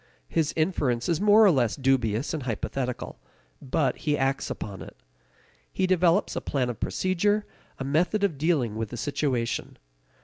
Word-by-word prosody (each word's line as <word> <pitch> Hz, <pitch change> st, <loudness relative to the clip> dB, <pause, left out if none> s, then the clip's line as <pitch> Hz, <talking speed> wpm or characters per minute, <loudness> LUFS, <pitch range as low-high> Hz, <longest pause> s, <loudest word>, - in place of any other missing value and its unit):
His 155 Hz, -2 st, 0 dB
inference 145 Hz, -8 st, 0 dB
is 170 Hz, 0 st, 0 dB
more 210 Hz, +1 st, +6 dB
or 195 Hz, -, +7 dB
less 125 Hz, -7 st, +1 dB
dubious 130 Hz, -2 st, +1 dB
and 155 Hz, -, -2 dB
hypothetical. 125 Hz, +1 st, -4 dB, 0.4 s
But 135 Hz, 0 st, 0 dB
he 150 Hz, -2 st, 0 dB
acts 135 Hz, +1 st, 0 dB
upon 100 Hz, -3 st, -6 dB
it. -, -, -11 dB, 0.7 s
He -, -, 0 dB
develops 180 Hz, +1 st, +2 dB
a -, -, -2 dB
plan 125 Hz, -3 st, -1 dB
of 115 Hz, -, -10 dB
procedure, 205 Hz, +3 st, 0 dB, 0.3 s
a -, -, -4 dB
method 170 Hz, +9 st, +1 dB
of 165 Hz, -9 st, 0 dB
dealing 145 Hz, -9 st, +1 dB
with 110 Hz, -1 st, -3 dB
the 120 Hz, -, -7 dB
situation. 125 Hz, -3 st, -2 dB
140 Hz, 160 wpm, -26 LUFS, 125-175 Hz, 0.7 s, or